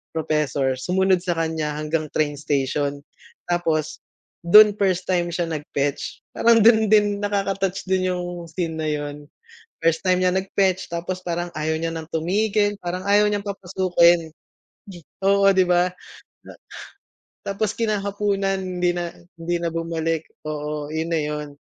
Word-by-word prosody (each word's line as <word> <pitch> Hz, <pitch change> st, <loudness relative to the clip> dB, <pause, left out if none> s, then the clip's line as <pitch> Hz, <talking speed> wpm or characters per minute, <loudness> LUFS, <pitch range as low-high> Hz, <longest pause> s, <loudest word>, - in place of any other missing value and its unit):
professor, 150 Hz, -4 st, 0 dB
sumunod 185 Hz, +4 st, +2 dB
sakanya 160 Hz, -4 st, -2 dB
hanggang 155 Hz, +1 st, -2 dB
train 145 Hz, -1 st, -1 dB
station. 145 Hz, 0 st, -1 dB, 0.5 s
Tapos 160 Hz, -3 st, -1 dB, 0.4 s
dun 210 Hz, +5 st, +8 dB
first 185 Hz, -3 st, +1 dB
time 175 Hz, -2 st, 0 dB
siya 175 Hz, +1 st, -1 dB
nag-fetch, 145 Hz, -3 st, -3 dB
parang 230 Hz, -2 st, +4 dB
dun 220 Hz, -2 st, +6 dB
din 205 Hz, -1 st, +3 dB
nakaka-touch 195 Hz, -2 st, -1 dB
din 185 Hz, 0 st, +1 dB
yung 175 Hz, -1 st, -6 dB
scene 165 Hz, 0 st, -3 dB
na 155 Hz, -, -2 dB
yun. 145 Hz, -1 st, -4 dB, 0.5 s
First 165 Hz, 0 st, +2 dB
time 185 Hz, -1 st, +3 dB
niya 185 Hz, 0 st, +2 dB
nag-fetch 190 Hz, -1 st, 0 dB
tapos 180 Hz, +2 st, -4 dB
parang 175 Hz, 0 st, -2 dB
ayaw 160 Hz, +1 st, -1 dB
niya 165 Hz, 0 st, -1 dB
ng 160 Hz, -1 st, -6 dB
tumigil 205 Hz, +5 st, +1 dB
parang 180 Hz, +1 st, -3 dB
ayaw 205 Hz, +1 st, +5 dB
niyang 205 Hz, 0 st, -2 dB
papasukin. 175 Hz, -4 st, +2 dB, 0.9 s
Oo 200 Hz, 0 st, +5 dB
di 190 Hz, -1 st, +4 dB
ba? 180 Hz, 0 st, +3 dB, 0.6 s
Na -, -, -10 dB, 0.9 s
tapos 200 Hz, +1 st, -2 dB
kinahapunan 200 Hz, -2 st, 0 dB
hindi 180 Hz, -1 st, 0 dB
na 175 Hz, -1 st, -3 dB, 0.3 s
hindi 170 Hz, +1 st, -2 dB
na 170 Hz, -, -2 dB
bumalik 165 Hz, -1 st, -2 dB, 0.2 s
oo, 150 Hz, -1 st, -4 dB
yun 160 Hz, +1 st, -2 dB
na 165 Hz, -, +2 dB
yun. 150 Hz, 0 st, -3 dB
175 Hz, 140 wpm, -22 LUFS, 160-195 Hz, 0.9 s, dun